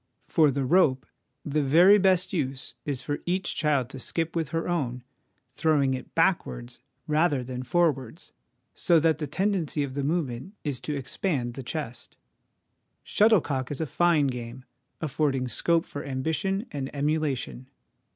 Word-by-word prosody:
For 155 -3 +4
the 140 0 -1
rope, 135 -4 +3 0.4
the 150 +1 0
very 175 +9 +6
best 185 -1 +2
use 135 -6 -3
is 135 -3 -3
for 145 +1 -2
each 185 +2 0
child 145 -5 +1
to 135 - -7
skip 165 +5 -2
with 165 -2 0
her 165 0 -2
own, 130 -8 -2 0.5
throw 155 +1 +2
ing 135 -1 +2
it 130 - -7
backwards 65 - 0 0.3
rather 150 -3 +2
than 125 0 -5
forwards, 150 -2 0 0.4
so 170 -2 +3
that 160 0 +2
the 150 - -3
tendency 185 -7 0
of 135 -2 -5
the 140 0 -2
movement 150 - -2
is 140 -5 -2
to 150 - -4
expand 130 -2 -2
the 135 - -6
chest. 125 -2 -6 0.9
Shuttlecock 160 - +2
is 145 - -4
a 160 - 0
fine 165 0 +3
game, 125 -1 -5 0.4
affording 140 -4 0
scope 165 +6 +1
for 145 - -7
ambition 160 - -1
and 135 -2 -4
emulation. 140 -3 -1
145 Hz, 150 wpm, -27 LUFS, 130-165 Hz, 0.9 s, very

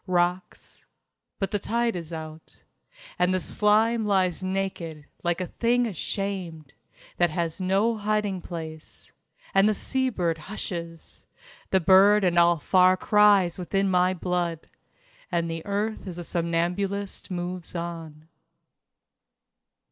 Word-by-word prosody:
Rocks... 180 0 -2 0.5
But 195 - -2
the 205 - 0
tide 235 +2 0
is 170 -2 -6
out, 160 -1 -9 0.6
And 180 +1 +3
the 185 - +1
slime 220 +4 +2
lies 190 -4 +1
naked, 185 -5 -3 0.2
like 175 0 0
a 185 - -2
thing 240 +6 +1
ashamed 185 - -4 0.4
That 175 -1 +3
has 165 +2 -3
no 200 +5 +1
hiding 210 -3 -1
place. 160 -3 -8 0.4
And 195 +2 +5
the 215 - +1
sea 260 +5 -1
bird 170 -8 -1
hushes 170 -3 -7 0.4
The 190 - +2
bird 195 +4 +6
and 175 -2 +3
all 170 0 +5
far 185 +3 +4
cries 205 -4 +4
within 195 +2 0
my 180 +1 +3
blood 175 -2 -2 0.6
And 170 -1 0
earth 205 +1 -2
as 175 -2 -6
a 175 - -5
somnambulist 180 +4 -2
moves 180 -1 -5
on. 165 -2 -6
185 Hz, 125 wpm, -26 LUFS, 170-200 Hz, 0.6 s, bird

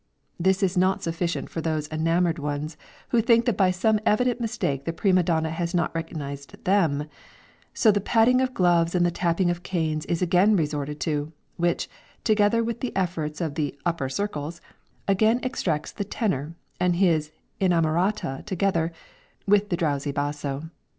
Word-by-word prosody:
This 190 +3 +2
is 190 0 +1
not 185 +1 +2
sufficient 170 +1 -2
for 165 - -3
those 155 -2 -1
enamoured 165 +2 +1
ones 150 +2 -3 0.3
who 235 - +3
think 230 0 +4
that 240 - +1
by 190 -1 +3
some 210 +4 +2
evident 245 +3 +2
mistake 140 - -2
the 165 - -2
prima 185 +1 +3
donna 160 -2 0
has 170 +2 -2
not 170 - 0
recognised 145 -4 -6
them, 160 -7 +2 0.6
so 220 - +4
the 205 0 0
patting 235 +5 +4
of 255 -1 -1
gloves 175 -1 +3
and 175 -1 +3
the 175 - +2
tapping 175 +1 +1
of 175 0 -4
canes 160 -4 -2
is 170 - 0
again 180 +4 +4
resorted 150 -3 -2
to, 150 -1 -2 0.2
which, 175 0 0 0.4
together 215 +1 +3
with 235 +1 -3
the 255 - -4
efforts 165 -5 -2
of 160 -4 -2
the 145 -3 -2
"upper 165 -6 -1
circles," 160 -1 -3 0.5
again 215 +4 +3
extracts 170 - -2
the - - -4
tenor 165 - -2 0.2
and 180 -1 +2
his 165 -5 +2 0.3
"inamorata" 175 -3 +1
together, 185 -4 0 0.5
with 205 0 +3
the 175 - 0
drowsy 145 -4 -1
basso. 145 +1 -3
170 Hz, 165 wpm, -25 LUFS, 155-195 Hz, 0.6 s, think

